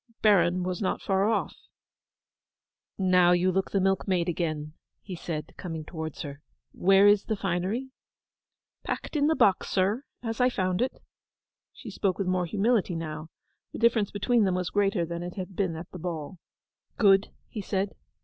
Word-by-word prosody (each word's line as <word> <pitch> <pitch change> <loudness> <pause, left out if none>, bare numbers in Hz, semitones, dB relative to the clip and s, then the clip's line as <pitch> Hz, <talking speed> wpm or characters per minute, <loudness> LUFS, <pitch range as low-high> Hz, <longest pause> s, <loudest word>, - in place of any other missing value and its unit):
Baron 180 -4 +4
was 180 +1 -3
not 190 - 0
far 195 +2 +1
off. 225 - -1 1.4
'Now 180 -2 +4
you 180 +1 +3
look 190 +1 0
the 200 - +1
milkmaid 190 -2 +1
again,' 155 -3 -2 0.3
he 195 - -7
said, 160 -2 -5
coming 165 -4 -5
towards 160 -2 -6
her. 140 0 -8 0.3
'Where 195 +2 +4
is 205 0 +5
the 220 - -1
finery?' 195 +7 -2 0.9
'Packed - - -4
in 290 -1 +3
the 320 - +3
box, 195 -9 +3
sir, 200 +7 +1 0.2
as 225 0 -2
I 250 - +5
found 185 -4 -1
it.' 260 +1 -2 0.7
She - - -10
spoke 195 -3 0
with 195 - -1
more 180 -1 0
humility 205 -1 +1
now. 155 -1 -5 0.4
The - - -5
difference 225 -3 +3
between 225 +3 +2
them 190 -2 +1
was 180 -1 -2
greater 200 -3 +1
than 170 +1 -5
it 175 0 -6
had 190 -1 -6
been 185 -4 0
at 165 +2 -8
the 180 - -8
ball. 165 +1 -5 0.6
'Good,' 195 -2 +5 0.2
he 215 - -6
said. 195 0 -2
185 Hz, 170 wpm, -27 LUFS, 175-205 Hz, 1.4 s, is